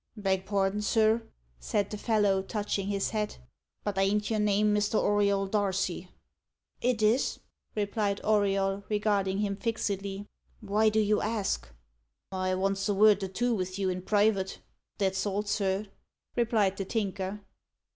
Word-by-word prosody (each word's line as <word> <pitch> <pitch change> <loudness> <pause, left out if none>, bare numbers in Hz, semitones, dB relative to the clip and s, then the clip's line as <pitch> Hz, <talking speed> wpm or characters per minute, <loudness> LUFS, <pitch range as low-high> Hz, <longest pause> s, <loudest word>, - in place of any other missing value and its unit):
"Beg 190 -2 0
pardin, 200 0 +1
sir," 220 +1 +3 0.4
said 200 - -1
the 210 - -4
fellow, 205 -4 +2
touching 200 0 -2
his 200 -1 -1
hat, 210 -1 -2 0.5
"but 200 -2 -2
ain't 205 +2 +1
your 220 - +1
name 210 0 +3
Mr. 210 +1 +1
Auriol 200 -1 +2
Darcy?" 190 -3 -1 0.7
"It 240 -3 +1
is," 225 +5 +2 0.4
replied 205 -1 0
Auriol, 200 -2 +1
regarding 205 -2 +1
him 200 -1 0
fixedly. 200 -2 -3 0.3
"Why 215 +1 +2
do 215 +1 +1
you 210 0 +2
ask?" 210 - -1 0.6
"I 185 -1 0
vants 195 +2 0
a 205 - +2
vord 210 0 +5
or 195 - -2
two 235 +5 0
vith 185 -1 -3
you 190 -2 0
in 180 0 -4
private 205 -1 +1 0.4
that's 190 0 0
all, 205 +1 -1
sir," 200 -1 0 0.5
replied 220 -5 +2
the 195 - -3
Tinker. 195 -1 -3
205 Hz, 145 wpm, -29 LUFS, 195-210 Hz, 0.7 s, vord